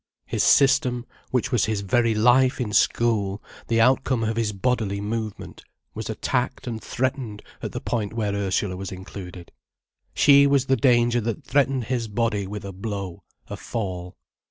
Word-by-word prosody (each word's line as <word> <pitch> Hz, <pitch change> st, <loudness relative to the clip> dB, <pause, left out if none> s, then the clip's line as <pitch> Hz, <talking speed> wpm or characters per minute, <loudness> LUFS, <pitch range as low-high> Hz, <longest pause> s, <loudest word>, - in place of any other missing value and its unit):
His -, -, -1 dB
system, 125 Hz, -3 st, +4 dB, 0.2 s
which 125 Hz, 0 st, 0 dB
was 120 Hz, -5 st, +2 dB
his 110 Hz, -2 st, -1 dB
very 115 Hz, +3 st, +2 dB
life 125 Hz, +4 st, +4 dB
in 110 Hz, -5 st, -2 dB
school, 105 Hz, -5 st, +2 dB, 0.3 s
the 115 Hz, 0 st, +1 dB
outcome 130 Hz, 0 st, +3 dB
of 110 Hz, 0 st, -1 dB
his 115 Hz, -2 st, 0 dB
bodily 105 Hz, -1 st, -1 dB
movement, 110 Hz, 0 st, -5 dB, 0.3 s
was -, -, -6 dB
attacked 125 Hz, +1 st, -2 dB
and 115 Hz, -3 st, -4 dB
threatened 130 Hz, -5 st, -3 dB, 0.2 s
at -, -, -4 dB
the -, -, -5 dB
point 110 Hz, -4 st, -2 dB
where 105 Hz, -3 st, -1 dB
Ursula 100 Hz, -1 st, -1 dB
was 95 Hz, +1 st, -6 dB
included. 90 Hz, -1 st, -9 dB, 0.6 s
She 140 Hz, 0 st, +6 dB
was 140 Hz, -2 st, +2 dB
the 135 Hz, 0 st, +3 dB
danger 120 Hz, -1 st, +3 dB
that 115 Hz, +7 st, -3 dB
threatened 135 Hz, -1 st, +1 dB
his 120 Hz, 0 st, -2 dB
body 105 Hz, -2 st, -1 dB
with 105 Hz, 0 st, -6 dB
a 100 Hz, -, -6 dB
blow, 100 Hz, -2 st, -5 dB, 0.3 s
a -, -, -5 dB
fall. 90 Hz, -5 st, -5 dB
115 Hz, 160 wpm, -24 LUFS, 100-125 Hz, 0.6 s, She